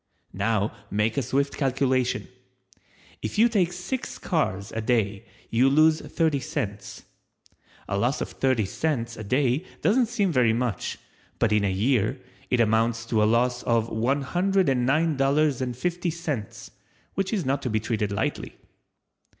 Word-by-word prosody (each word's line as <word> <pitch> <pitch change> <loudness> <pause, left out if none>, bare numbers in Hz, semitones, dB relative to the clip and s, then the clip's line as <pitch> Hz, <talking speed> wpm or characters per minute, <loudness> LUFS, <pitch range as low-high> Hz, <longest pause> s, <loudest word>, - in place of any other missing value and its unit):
Now 105 +1 0
make 105 +2 0
a 140 - +1
swift 140 +2 -1
calculation— 130 -2 0 0.9
If 110 - -4
you 225 +3 +6
take 195 -7 +1
six 180 +9 -5
cars 100 - -1
a 115 - -3
day 110 -2 0 0.2
you 125 +4 +4
lose 155 +3 +4
thirty 160 -4 0
cents. 125 -9 -5 0.8
A 100 +1 -1
loss 125 +7 +1
of - - -4
thirty 130 -5 +1
cents 115 +1 -2
a 110 - -7
day 130 - +1 0.2
doesn't 235 +3 +3
seem 210 -5 0
very 125 -6 +3
much, 115 -5 -2 0.4
but 115 - +1
in 105 -1 +3
a 100 - +2
year, 110 +4 +1 0.3
it 125 - +1
amounts 115 0 +2
to 115 -1 +1
a - - +5
loss 125 +2 +2
of 115 -1 +1
$109.50 145 - 0 0.4
which 195 -1 -1
is 200 -7 -1
not 135 +1 0
to 125 - -2
be 110 -1 +1
treated 110 -2 -2
lightly. 100 - -2
125 Hz, 140 wpm, -25 LUFS, 110-155 Hz, 0.9 s, you